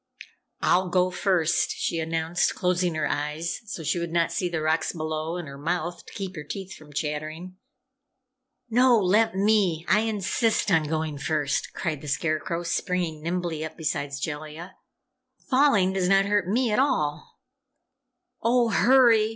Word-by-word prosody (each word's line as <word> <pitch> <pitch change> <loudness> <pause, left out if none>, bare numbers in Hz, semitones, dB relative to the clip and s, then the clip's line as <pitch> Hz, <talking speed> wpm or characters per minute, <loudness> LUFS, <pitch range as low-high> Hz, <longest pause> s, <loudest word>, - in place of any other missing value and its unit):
"I'll 185 0 +2
go 180 0 +2
first," 180 -3 +1
she 165 - -1
announced, 165 +1 0
closing 180 -2 0
her 155 -1 0
eyes 150 +3 -2
so 180 -6 -6
she 170 - 0
would 170 -1 -4
not 170 0 +1
see 180 - -1
the 165 -2 -2
rocks 160 +1 +1
below, 155 0 -3
and 175 -4 -6
her 140 0 -9
mouth, 175 +3 -2
to - - -12
keep 195 -3 -5
her 150 - -6
teeth 190 +5 -7
from 155 -1 -14
chattering. 155 +4 -4 1.1
"No! 245 +1 +4
Let 205 +2 +3
me! 195 -5 +2
I 210 - +4
insist 220 0 0
on 160 -3 +3
going 155 -2 -2
first," 145 0 -1
cried 155 -6 -3
the 150 - -9
Scarecrow, 155 +3 -1
springing 170 -2 -2
nimbly 170 -1 -2
up 160 - -7
beside 145 -2 -2
Jellia. 155 +4 -6 0.8
"Falling 255 -9 +4
does 185 -2 0
not 195 0 +4
hurt 205 -2 +1
me 235 +4 +1
at 210 - +2
all." 150 - 0 1.1
"Oh, 235 0 +3
hurry! 230 0 +5
175 Hz, 155 wpm, -25 LUFS, 155-195 Hz, 1.1 s, hurry